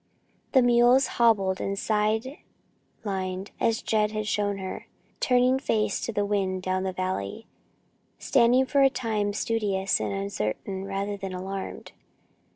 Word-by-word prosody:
The 260 -2 +6
mules, 245 +2 +5 0.2
hobbled 195 -5 +3
and 195 0 -2
side 220 +6 0 0.6
lined 190 -1 -3
as 225 -1 +1
Jed 215 -1 +1
had 215 0 -2
shown 205 -1 0
her, 190 -1 -6 0.3
turned 255 +1 +3
face 215 -5 0
to - - -2
the 205 -2 0
wind, 190 -2 -1
down 185 0 0
the 190 0 -2
valley, 185 - -4 0.7
standing 245 +3 +3
for 280 +1 +2
a 270 - +6
time 220 -5 -1
studious 205 -3 0
and - - -2
uncertain 195 - -3
rather 200 +1 -3
than 195 -1 -6
alarmed. 190 +1 -6
205 Hz, 140 wpm, -26 LUFS, 190-230 Hz, 0.7 s, The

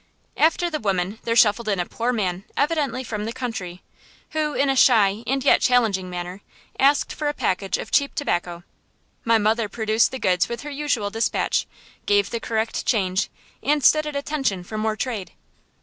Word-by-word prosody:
After 330 +3 +2
the 310 -3 -3
woman 195 0 -1
there 230 - 0
shuffled 225 0 +4
in 200 -3 0
a 175 - 0
poor 235 +6 -2
man 190 -5 -2
evidently 285 -5 0
from 210 -3 -4
the 225 - -3
country, 220 -8 -5 0.5
who, 305 -1 -1
in 280 - +2
a 270 - +2
shy 220 -4 +4
and 270 +1 0
yet - - +5
challenging 220 -7 +2
manner, 180 +2 -6 0.4
asked 280 +2 +3
for 300 - -3
a 295 - -4
package 190 +1 -1
of - - -7
cheap 280 -1 +2
tobacco. 175 - -2 0.6
My 230 0 +4
mother 220 0 +1
produced 220 +2 +2
the 260 - -5
goods 180 -7 +1
with 235 - -4
her 295 - -7
usual 280 -8 -1
dispatch, 225 +2 0 0.4
gave 205 -1 +2
the 235 - -2
correct 225 0 -2
change, 190 -5 0 0.3
and 295 -1 +1
stood 305 +2 +5
at 300 - -5
attention 280 -10 -1
for 215 - -8
more 215 0 -1
trade. 220 -5 -4
225 Hz, 180 wpm, -23 LUFS, 200-270 Hz, 0.6 s, yet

